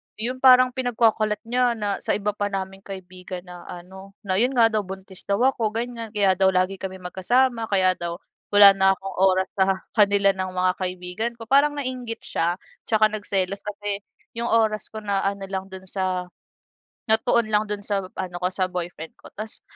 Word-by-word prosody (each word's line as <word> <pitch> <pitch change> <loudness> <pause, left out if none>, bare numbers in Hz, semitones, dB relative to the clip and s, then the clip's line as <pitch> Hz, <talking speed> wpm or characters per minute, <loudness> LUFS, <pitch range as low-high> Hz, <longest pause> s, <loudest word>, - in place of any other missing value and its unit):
'Yon 245 +4 -4
parang 255 -1 +7
pinagkakalat 225 -4 +1
niya 245 +1 +1
na 205 -3 -2
sa - - -1
iba 210 0 0
pa 205 - 0
naming 195 0 -5
kaibigan 185 -1 -8
na 180 -1 -11
ano, 190 +2 -11
na 190 -1 -1
'yon 250 +5 +2
nga 230 -2 +5
daw 215 -3 -1
buntis 190 0 -9
daw 200 +3 +1
ako, 235 -5 +2
ganyan. 230 -1 -4
Kaya 195 -3 +3
daw 190 0 +3
lagi 185 +1 +1
kami 190 -1 -6
magkasama. 230 +6 +1
Kaya 185 -2 +2
daw 170 0 -4 0.4
wala 205 -1 +10
na 195 0 +5
akong 190 0 -8
oras 190 0 +3
sa 190 - +4 0.3
kanila 200 -1 +5
ng 185 -1 -4
mga 185 0 +2
kaibigan 185 +5 -3
ko. 225 0 -11
Parang 285 +2 +4
nainggit 255 -5 -4
siya. 170 +2 -1 0.3
Tsaka 215 -1 +4
nagselos 200 -2 -2
kasi 205 -1 -4 0.4
'yong 235 0 -1
oras 220 -2 +2
ko 220 - -6
na 200 -2 -1
ano 200 0 -2
lang 190 -1 -3
do'n 190 -1 -9
sa 185 -2 -1 0.8
natuon 225 +1 +3
lang 210 0 +2
do'n 205 -1 -2
sa 200 -2 0 0.2
ano 180 -2 -4
ko, 180 - +2
sa 185 0 0
boyfriend 175 -3 -6
ko. - - -14
Tapos 215 0 -6
200 Hz, 185 wpm, -24 LUFS, 185-225 Hz, 0.8 s, wala